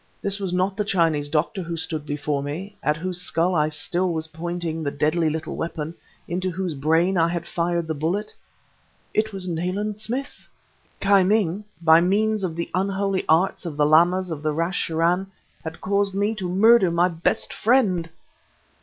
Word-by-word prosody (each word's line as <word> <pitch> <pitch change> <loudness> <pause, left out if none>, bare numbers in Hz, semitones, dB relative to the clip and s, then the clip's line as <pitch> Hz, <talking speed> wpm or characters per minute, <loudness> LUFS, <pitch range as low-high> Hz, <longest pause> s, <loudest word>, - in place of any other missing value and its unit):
This 200 0 -1
was 195 -3 -3
not 185 +2 0
the 210 - +1
Chinese 165 -7 +1
doctor 160 +6 0
who 170 -1 -5
stood 155 -2 -3
before 145 -1 -2
me, 170 +9 -6
at 150 0 +1
whose 180 +1 -2
skull 175 +1 +1
I 155 -2 +2
still 175 +4 -1
was 160 -1 -1
pointing 170 0 -4
the 145 - -1
deadly 155 +3 +1
little 155 +1 -4
weapon, 160 -1 -4 0.3
into 185 +2 -2
whose 180 -1 -3
brain 165 +6 +2
I 165 - +4
had 170 0 -3
fired 170 -2 -1
the 160 - -2
bullet; 170 +8 -2 0.8
it 220 +1 +1
was 190 -2 -5
Nayland 185 +5 -2
Smith! 260 +6 -4 0.5
Ki 200 0 +4
Ming, 200 0 +1 0.2
by 160 0 +7
means 210 +3 +1
of 170 -3 -2
the 170 0 -4
unholy 195 +1 0
arts 165 +5 +3
of 165 -5 -6
the 150 - +3
Lamas 175 +4 +4
of 155 -2 -5
Rache 165 +3 -1
Churân, 170 +4 +1 0.4
had 160 0 -7
caused 200 0 0
my 205 +2 +1
to 190 -5 -4
murder 205 +1 +5
my 170 +1 +3
best 170 -1 -1
friend! 205 -9 +2
175 Hz, 175 wpm, -23 LUFS, 160-195 Hz, 0.8 s, by